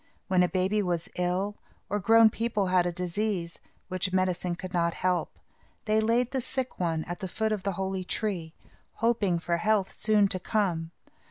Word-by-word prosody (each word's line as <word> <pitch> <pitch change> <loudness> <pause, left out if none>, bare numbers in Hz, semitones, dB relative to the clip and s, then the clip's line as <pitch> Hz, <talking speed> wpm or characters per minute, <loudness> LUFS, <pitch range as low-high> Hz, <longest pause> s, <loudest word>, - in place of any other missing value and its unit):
When 185 -1 +4
a 180 - +3
baby 190 +3 +1
was 175 -4 -2
ill, 185 +3 -1 0.3
or 205 - -1
grown 225 +2 +6
people 220 -3 0
had 180 -1 +4
a - - 0
disease, 180 0 -2 0.3
which 185 0 -1
medicine 185 -1 0
could 185 +1 -8
not 170 -1 +1
help, 180 -1 -1 0.5
they 215 -1 +3
laid 235 +3 +2
the 265 - -1
sick 260 +1 -4
one 165 -3 0
at 175 +2 -6
the 190 - -4
foot 220 +4 -1
of 210 -2 -1
the 195 0 -1
holy 190 0 -2
tree, 180 -5 -3 0.4
hoping 220 -6 +1
for 170 0 -1
health 210 +1 +1
soon 210 -2 +3
to 185 -2 -1
come. 175 -5 0
190 Hz, 180 wpm, -28 LUFS, 175-215 Hz, 0.5 s, grown